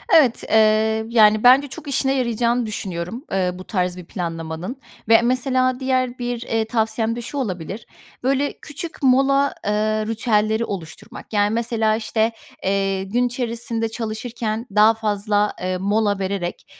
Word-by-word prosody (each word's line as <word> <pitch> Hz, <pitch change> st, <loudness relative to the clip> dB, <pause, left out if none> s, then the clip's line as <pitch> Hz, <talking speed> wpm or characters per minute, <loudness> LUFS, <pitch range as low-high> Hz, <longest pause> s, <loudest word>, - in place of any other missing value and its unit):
Evet, 270 Hz, -8 st, +4 dB
eee, 220 Hz, 0 st, +3 dB
yani, 215 Hz, -2 st, +5 dB
bence 265 Hz, +3 st, +6 dB
çok 300 Hz, +2 st, -10 dB
işine 270 Hz, 0 st, +1 dB
yarayacağını 235 Hz, 0 st, +1 dB
düşünüyorum, 195 Hz, -, -5 dB
eee, 185 Hz, -2 st, +1 dB
bu 185 Hz, +1 st, -9 dB
tarz 180 Hz, -3 st, -2 dB
bir 180 Hz, -, -9 dB
planlamanın 165 Hz, +4 st, -5 dB, 0.3 s
ve, 225 Hz, 0 st, +7 dB
mesela, 255 Hz, +1 st, +1 dB
diğer 255 Hz, -1 st, 0 dB
bir, 245 Hz, -1 st, -3 dB
eee, 225 Hz, -2 st, -1 dB
tavsiyem 225 Hz, 0 st, 0 dB
de 240 Hz, -, -5 dB
şu 280 Hz, +5 st, -6 dB
olabilir: 195 Hz, -, -4 dB, 0.4 s
Böyle, 275 Hz, +2 st, +1 dB
küçük 310 Hz, +2 st, -8 dB
mola, 275 Hz, +2 st, +3 dB
eee, 210 Hz, -, +1 dB, 0.4 s
ritüelleri 220 Hz, 0 st, +1 dB
oluşturmak, 180 Hz, +1 st, -8 dB
yani, 205 Hz, 0 st, +3 dB
mesela, 225 Hz, -2 st, +1 dB
işte, 220 Hz, 0 st, 0 dB, 0.3 s
eee, 195 Hz, 0 st, 0 dB
gün 240 Hz, +6 st, 0 dB
içerisinde 235 Hz, -2 st, -2 dB
çalışırken 225 Hz, 0 st, -4 dB
daha 215 Hz, +2 st, +6 dB
fazla, 210 Hz, -1 st, 0 dB
eee, 185 Hz, 0 st, -1 dB
mola 205 Hz, +1 st, +1 dB
vererek, 190 Hz, -2 st, -3 dB
225 Hz, 145 wpm, -21 LUFS, 205-245 Hz, 0.4 s, ve